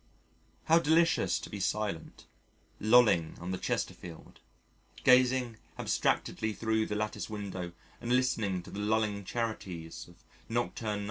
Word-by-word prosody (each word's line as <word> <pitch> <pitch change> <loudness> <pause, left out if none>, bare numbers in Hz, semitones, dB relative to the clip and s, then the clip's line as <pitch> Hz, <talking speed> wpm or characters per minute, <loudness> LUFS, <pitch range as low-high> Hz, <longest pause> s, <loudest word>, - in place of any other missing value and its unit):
How 165 +1 +5
delicious 165 +2 +3
to - - -7
be 105 - -6
silent, 100 -3 -2 0.5
lolling 110 -8 +4
on 90 +2 -5
the 95 - -3
Chesterfield, 85 -3 -4 0.6
gazing 125 -2 +4 0.2
abstractedly 110 -1 0
thro' 110 0 0
the 105 - -3
lattice 105 +1 -3
window 95 -5 -5 0.3
and 120 - -3
listening 110 -8 +1
to - - -11
the 100 - -6
lulling 105 -1 0
charities 95 -8 -4
of - - -19 0.3
Nocturne 115 -2 -1
No. - - -3
110 Hz, 130 wpm, -31 LUFS, 95-120 Hz, 0.6 s, How